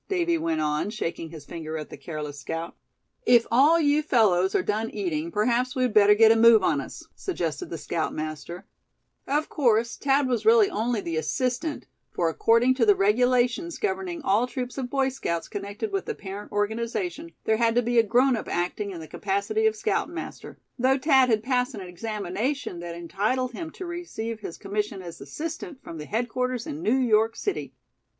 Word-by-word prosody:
Davy 345 -3 +1
went 165 - -1
on, 150 +5 0
shaking 170 -6 -4
his 155 -3 -10
finger 160 0 -6
at 155 - -7
the - - -6
careless 150 -3 -6
scout. 165 +4 -5 0.5
"If 240 - +5
all 290 +8 +5
you 295 -1 +3
fellows 195 -10 +3
are - - +2
done 220 +2 -1
eating, 170 -5 -3
perhaps 240 - +1
we'd 255 -3 +1
better 210 0 +6
get 220 +1 +7
a - - +5
move 225 -2 +7
on 150 -6 +2
us," - - -9
suggested 165 - -3
the 165 - -4
scoutmaster; 155 +1 -4 0.6
of 295 +3 0
course 235 -4 +1
Thad 275 0 +2
was 245 -2 0
really 445 -3 +5
only 230 - -1
the 165 -3 -3
assistant, 250 - -2 0.2
for 170 -2 0
according 230 - +3
to 255 -3 +2
the 205 - +7
regulations 245 - +2
governing 380 -5 -3
all 220 +2 +2
troops 250 0 -5
of 250 -2 -3
Boy 270 0 +1
Scouts 170 -11 -3
connected 205 - -5
with 390 -1 -2
the 450 - -2
parent 200 - -8
organization, 235 - -2
there 220 - +2
had 230 0 +2
to 245 - +3
be 240 0 +3
a - - +6
grown 245 +4 +3
up 220 - -5
acting 180 +4 -2
in 175 -4 -7
the 160 - -9
capacity 430 - 0
of 435 - +1
scoutmaster; - - -3 0.2
though 260 +2 +3
Thad 265 -2 +4
had 220 -2 +2
passed 250 0 0
an 205 - -6
examination 205 +4 -3
that 170 -1 -6
entitled 210 +9 -1
him 320 +7 -6
to 370 - -7
receive 340 -11 -5
his 185 -5 -7
commission 205 -1 -3
as 170 -4 -9
assistant, 310 - -6
from 165 - -8
the 150 - -6
headquarters 245 +3 -2
in 150 - -6
New 225 +8 +2
York 225 -3 +3
City. 405 - -3
230 Hz, 185 wpm, -26 LUFS, 185-265 Hz, 0.6 s, get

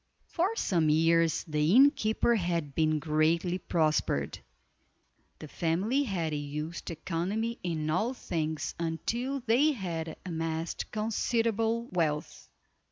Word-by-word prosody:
For 375 +6 -1
some 170 - +1
years 165 +1 +3
the 150 +4 +2
innkeeper 260 -4 +4
had 170 -8 -1
been 155 0 +2
greatly 160 +3 +1
prospered. 155 - 0 1.0
The 155 - -9
family 185 - 0
had 175 - -2
used 150 +3 -4
economy 190 +8 -2
in 160 -3 -2
all 215 +11 0
things 155 -7 -3
until 235 +12 -2
they 260 +6 +3
had 165 - -4
amassed 165 -1 -3
considerable 225 +1 0
wealth. 155 -4 -2
170 Hz, 105 wpm, -29 LUFS, 160-225 Hz, 1.0 s, innkeeper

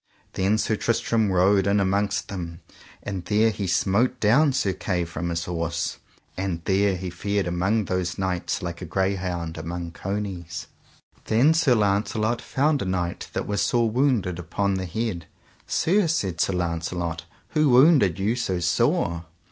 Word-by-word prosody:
Then 95 +3 +1
Sir 110 0 0
Tristram 115 -2 +1
rode 95 +2 +3
in 100 +1 +3
amongst 100 +1 0
them, 85 -4 -6 0.4
and 95 -3 -4
there 110 +4 +3
he 100 -2 -4
smote 100 +6 +1
down 135 +8 +4
Sir 115 -8 0
Kay 90 -2 -2
from 85 +1 -4
his 85 0 -2
horse; 85 -1 -3 0.4
and 95 -3 -2
there 95 0 +2
he 90 0 -5
fared 100 +3 -1
among 95 +5 0
those 90 -2 -2
knights 95 -2 -2
like 85 0 -5
a - - -4
greyhound 90 -2 -2
among 85 +1 -5
conies. 95 -3 -5 0.6
Then 125 +9 +4
Sir 160 -6 +3
Launcelot 110 +2 +1
found 145 +1 +1
a - - -2
knight 90 -2 -2
that - - -2
was 100 -1 -1
sore 115 +2 +2
wounded 115 - +1
upon 100 +3 -1
the 95 -1 -2
head. 95 -3 -3 0.4
Sir, 190 +2 +2
said 95 - -1
Sir 95 - +1
Launcelot, 85 -1 -2 0.2
who 155 -2 +2
wounded 125 - +5
you 105 +4 0
so 105 -7 -1
sore? 85 -1 +1
95 Hz, 155 wpm, -24 LUFS, 85-110 Hz, 0.6 s, wounded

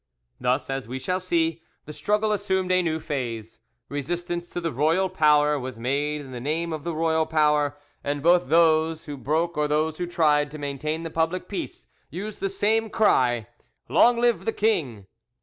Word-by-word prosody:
Thus, 125 +3 0
as 135 -3 -4
we 130 +2 -4
shall 180 +7 -1
see, 165 -3 0 0.2
the 150 - -8
struggle 210 +8 0
assumed 190 -3 0
a 185 0 +4
new 160 -2 -1
phase: 115 -7 -5 0.3
resistance 175 +4 -3
to 175 - -5
the 165 -2 -2
royal 160 +8 +2
power 150 -4 +3
was 130 -2 -6
made 145 +5 -1
in 135 -2 -11
the 125 -1 -6
name 160 +5 -2
of 155 -2 -5
the 170 -1 -3
royal 160 0 +1
power, 150 -2 +2 0.3
and 145 0 -2
both 175 -3 +4
those 160 0 +3
who 145 -3 -6
broke 160 +5 -1
or 150 0 +2
those 155 +2 0
who 175 - -2
tried 150 -4 +2
to 155 - -8
maintain 150 +3 -3
the 165 - -5
public 165 +3 -1
peace 200 - -6 0.2
used 205 +5 -6
the 195 - -1
same 220 +3 +1
cry, 125 - +2 0.4
"Long 240 0 +5
live 240 -1 +2
the 225 - +1
king!" 140 - 0
160 Hz, 185 wpm, -25 LUFS, 145-175 Hz, 0.4 s, Long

